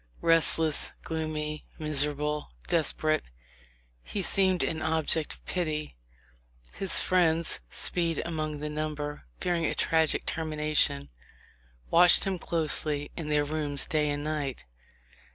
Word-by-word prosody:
Restless, 165 -2 +4
gloomy, 155 -1 -4
miserable, 150 0 -1 0.2
desperate, 155 -2 +1 0.8
he 200 - -4
seemed 190 -1 +2
an 160 -1 -2
object 160 -1 0
of - - -26
pity. 155 - -3 0.8
His 195 - +5
friends, 170 -2 +2
Speed 170 - +1
among 155 -3 -4
the 150 - -3
number, 150 - -5
fearing 175 -2 -1
a - - -2
tragic 160 -1 +1
termination, 150 - 0 0.8
watched 175 +1 +7
him 190 -2 -2
closely 155 -3 -1
in 160 -3 -5
their 150 -1 +1
rooms 145 -2 -3
day 155 -3 0
and 145 0 -3
night. 150 -3 -4
155 Hz, 115 wpm, -28 LUFS, 150-165 Hz, 0.8 s, watched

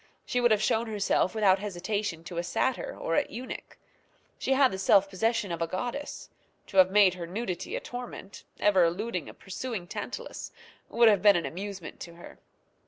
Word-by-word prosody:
She 245 - 0
would 240 - +5
have 215 -1 +3
shown 225 +2 +1
herself 205 -2 +1
without 195 -3 +4
hesitation 200 -2 -3
to 170 +1 -8
a - - -1
satyr 260 +8 -1
or 165 - -2
a - - +2
eunuch. 245 +5 -8 0.6
She 270 - +1
had 265 -1 +4
the 190 - -5
self 195 0 +5
possession 210 +1 0
of 170 0 -4
a 165 - +1
goddess. 245 - -5 0.4
To - - -2
have 185 -1 +8
made 195 -2 +5
her 175 -2 -6
nudity 185 -1 -4
a - - -1
torment, 245 -5 -8 0.2
ever 195 -3 +4
eluding 180 0 -1
a - - -10
pursuing 200 0 -5
Tantalus, - - -6 0.4
would 235 0 +5
have 210 -2 +5
been 205 -1 +7
an 170 -3 0
amusement 185 +4 -6
to 170 -1 -9
her. 175 - -13
200 Hz, 185 wpm, -28 LUFS, 180-225 Hz, 0.6 s, have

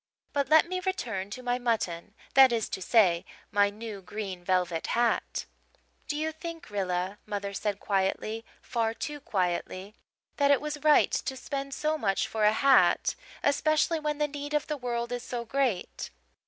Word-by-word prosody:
But 280 -2 0
let 315 +2 +6
me 370 +1 -2
return 235 - -3
to 255 +5 -7
my 245 0 0
mutton 210 -5 -1 0.2
that 265 -1 +8
is 230 -2 0
to 190 - -4
say, 180 -4 +4 0.3
my 205 0 +4
new 210 -1 -7
green 190 -2 -6
velvet 180 -2 0
hat. 235 -1 +1 0.6
"'Do 295 - -2
you 315 +1 -1
think, 330 -4 -8
Rilla,' 185 0 -2
mother 200 -1 -3
said 205 0 -2
quietly 205 +3 -1 0.2
far 230 -2 -1
too 295 +3 -5
quietly 185 -3 -2 0.4
'that 280 -1 +3
it 285 -2 +5
was 300 0 -4
right 305 -1 +5
to 265 - -2
spend 275 0 -4
so 310 0 0
much 195 -5 +1
for 220 -1 0
a 210 - +6
hat, 265 +4 +4 0.3
especially 310 +3 +2
when 300 -1 -2
the 295 0 +1
need 290 +1 -5
of 300 - +1
the 300 - -2
world 240 -3 -3
is 245 0 -2
so 240 -1 -5
great?' 250 -6 -1
235 Hz, 170 wpm, -29 LUFS, 200-290 Hz, 0.6 s, that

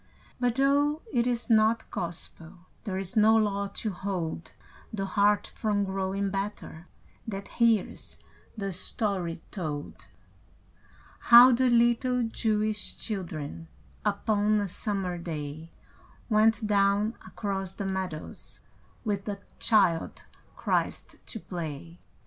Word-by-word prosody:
But 245 -2 +1
though 285 +3 +2
it 240 -1 +2
is 240 -1 0
not 225 -1 +3
Gospel, 170 0 -5 0.2
There 190 -3 -2
is 190 -1 -4
no 220 +1 +6
law 200 -2 +1
to 215 - -2
hold 180 -4 -4 0.4
The 195 -3 -2
heart 205 +1 +3
from 210 -2 -1
growing 195 0 -1
better 195 -4 -5 0.4
That 200 -2 -5
hears 230 -4 +1 0.4
the 195 -2 -2
story 185 -2 -2
told: 155 -6 -5 1.2
How 240 +2 +11
the 255 +1 +3
little 240 +1 +3
Jewish 215 -2 0
children 165 -6 -5 0.4
Upon 210 0 +2
a 205 - -1
summer 190 -2 -3
day, 155 -1 -6 0.6
Went 220 +1 +4
down 205 +1 +2
across 195 -2 -3
the 200 - -4
meadows 190 -5 -4 0.5
With 200 -2 -1
the 205 -2 -4 0.2
Child 190 -7 +2 0.3
Christ - - -1
to 225 - -4
play. 170 -2 -6
200 Hz, 115 wpm, -28 LUFS, 180-220 Hz, 1.2 s, How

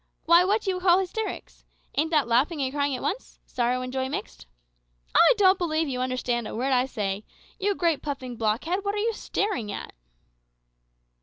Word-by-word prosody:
Why, 340 +2 +7
what 415 +4 +1
do 385 - 0
you 365 - -3
call 360 -1 +5
hysterics? 385 +3 -4 0.3
Ain't 310 +3 +1
that 300 -6 +2
laughing 265 +7 +2
and 265 -1 -1
crying 285 -2 0
at - - -6
once - - -4
sorrow 250 +1 -1
and 255 0 -6
joy 260 0 -1
mixed? 270 -6 -6 0.7
I 340 - +7
don't 380 -2 +5
believe 320 -2 0
you 255 -2 -2
understand 250 -2 -1
a - - -6
word 260 +4 -1
that 255 - +4
I 255 - 0
say. 205 -5 -3 0.4
You 405 0 +1
great 335 -5 +1
puffing 265 -4 -5
blockhead, 235 - -1
what 405 0 -1
are - - -3
you 450 +2 0
staring 400 - -2
at?" - - -7
285 Hz, 190 wpm, -26 LUFS, 250-370 Hz, 0.7 s, Why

